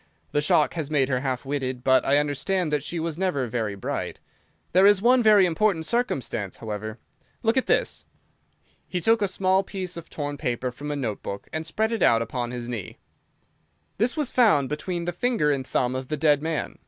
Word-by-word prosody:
The 145 Hz, -, +1 dB
shock 150 Hz, -, +3 dB
has 160 Hz, -4 st, -4 dB
made 140 Hz, -3 st, +2 dB
her 130 Hz, -2 st, +1 dB
half 130 Hz, 0 st, -3 dB
witted, 130 Hz, -3 st, -3 dB
but 130 Hz, -1 st, +4 dB
I 140 Hz, -, +3 dB
understand 150 Hz, +4 st, 0 dB
that 150 Hz, -, +1 dB
she 170 Hz, +2 st, -3 dB
was 165 Hz, 0 st, -3 dB
never 180 Hz, -9 st, 0 dB
very 110 Hz, -3 st, -2 dB
bright. 100 Hz, -, -4 dB, 0.5 s
There 190 Hz, +3 st, +6 dB
is 205 Hz, -1 st, +6 dB
one 245 Hz, +4 st, +4 dB
very 210 Hz, -4 st, +6 dB
important 175 Hz, -1 st, +1 dB
circumstance, 135 Hz, -, -1 dB
however. 110 Hz, 0 st, -5 dB, 0.5 s
Look 225 Hz, +1 st, +2 dB
at 260 Hz, -, +1 dB
this!" -, -, +1 dB, 0.8 s
He 180 Hz, -, -2 dB
took 225 Hz, +5 st, +3 dB
a 200 Hz, -, +3 dB
small 190 Hz, 0 st, +2 dB
piece 185 Hz, -2 st, -5 dB
of 170 Hz, -, -9 dB
torn 145 Hz, -1 st, -4 dB
paper 125 Hz, +1 st, -2 dB
from 145 Hz, +4 st, -7 dB
a 145 Hz, -, -2 dB
note 115 Hz, -8 st, -3 dB
book 100 Hz, 0 st, -6 dB
and 160 Hz, +1 st, -3 dB
spread 220 Hz, +7 st, 0 dB
it 230 Hz, -, -2 dB
out 115 Hz, 0 st, +4 dB
upon 120 Hz, +1 st, -4 dB
his 120 Hz, -1 st, -5 dB
knee. 115 Hz, -7 st, -6 dB, 1.0 s
"This 245 Hz, +7 st, +1 dB
was 295 Hz, -4 st, 0 dB
found 205 Hz, -, +4 dB
between 170 Hz, +3 st, -3 dB
the 175 Hz, -, -2 dB
finger 175 Hz, -7 st, +1 dB
and 135 Hz, -2 st, -2 dB
thumb 125 Hz, 0 st, 0 dB
of 130 Hz, 0 st, -4 dB
the 155 Hz, -, -2 dB
dead 145 Hz, -1 st, +3 dB
man. 160 Hz, 0 st, -3 dB
150 Hz, 205 wpm, -25 LUFS, 130-190 Hz, 1.0 s, There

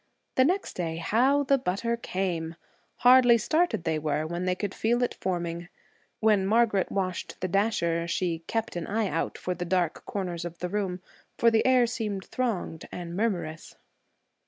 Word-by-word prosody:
The 260 Hz, -, +4 dB
next 370 Hz, +6 st, 0 dB
day, 165 Hz, -2 st, -3 dB
how 250 Hz, +12 st, +2 dB
the 275 Hz, 0 st, +3 dB
butter 235 Hz, +1 st, -1 dB
'came'! 175 Hz, -7 st, -3 dB, 0.5 s
Hardly 245 Hz, -1 st, +8 dB
started 310 Hz, -, +1 dB
they 160 Hz, -2 st, 0 dB
were, 150 Hz, 0 st, -1 dB
when 175 Hz, +3 st, -3 dB
they 180 Hz, 0 st, +1 dB
could 200 Hz, 0 st, -3 dB
feel 240 Hz, +2 st, +1 dB
it 245 Hz, -, 0 dB
forming. 175 Hz, -1 st, -3 dB, 0.5 s
When 215 Hz, -3 st, +3 dB
Margaret 215 Hz, -3 st, +2 dB
washed 185 Hz, -3 st, -3 dB
the 185 Hz, -, -1 dB
dasher, 170 Hz, -4 st, +1 dB
she 170 Hz, -1 st, -1 dB
'kept 225 Hz, -1 st, -2 dB
an 170 Hz, -2 st, -3 dB
eye 215 Hz, -1 st, 0 dB
out' -, -, -2 dB
for 180 Hz, -, -3 dB
the 180 Hz, -, -4 dB
dark 175 Hz, -2 st, 0 dB
corners 180 Hz, -4 st, -3 dB
of 175 Hz, 0 st, -6 dB
the 180 Hz, -, -4 dB
room, 185 Hz, -2 st, -2 dB, 0.4 s
for 230 Hz, -, +4 dB
the 225 Hz, -, +3 dB
air 255 Hz, -2 st, +5 dB
seemed 210 Hz, -5 st, -3 dB
thronged 220 Hz, -10 st, -3 dB
and 175 Hz, -1 st, -6 dB
murmurous. 175 Hz, -7 st, -2 dB
190 Hz, 170 wpm, -27 LUFS, 170-230 Hz, 0.5 s, Hardly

